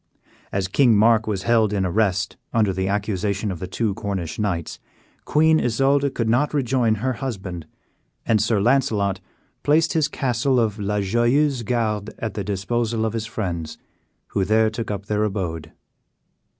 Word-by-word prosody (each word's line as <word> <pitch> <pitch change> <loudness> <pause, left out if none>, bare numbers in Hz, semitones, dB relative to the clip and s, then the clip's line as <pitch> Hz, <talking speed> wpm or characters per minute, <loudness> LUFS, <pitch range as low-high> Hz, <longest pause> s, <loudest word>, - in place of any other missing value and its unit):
As 95 -1 -1
King 120 +3 +4
Mark 110 +1 +4
was 100 -3 -2
held 110 -1 +3
in 100 -2 0
arrest 95 0 0 0.2
under 105 -4 +2
the 95 0 -1
accusation 100 0 -1
of 90 - -6
the 95 - -5
two 105 +2 -1
Cornish 95 -6 -4
knights, 90 -6 -2 0.5
Queen 160 +1 +4
Isoude 135 +4 +1
could 115 - -1
not 130 +7 +1
rejoin 125 -4 +2
her 130 +5 -1
husband, 95 - -5 0.6
and 110 -3 +3
Sir 110 -1 +1
Launcelot 105 -5 +1 0.4
placed 160 +3 +3
his 155 -3 +2
castle 130 -2 0
of 110 -2 0
La 105 0 -1
Joyeuse 120 +7 +2
Garde 110 -3 -2
at 110 - -4
the 100 - -3
disposal 110 +3 -1
of 110 - -2
his 115 -1 -3
friends, 85 -8 -4 0.5
who 100 - 0
there 110 +2 +3
took 115 +1 -5
up 100 -1 -4
their 105 0 0
abode. 85 -6 -3
110 Hz, 160 wpm, -22 LUFS, 100-120 Hz, 0.6 s, King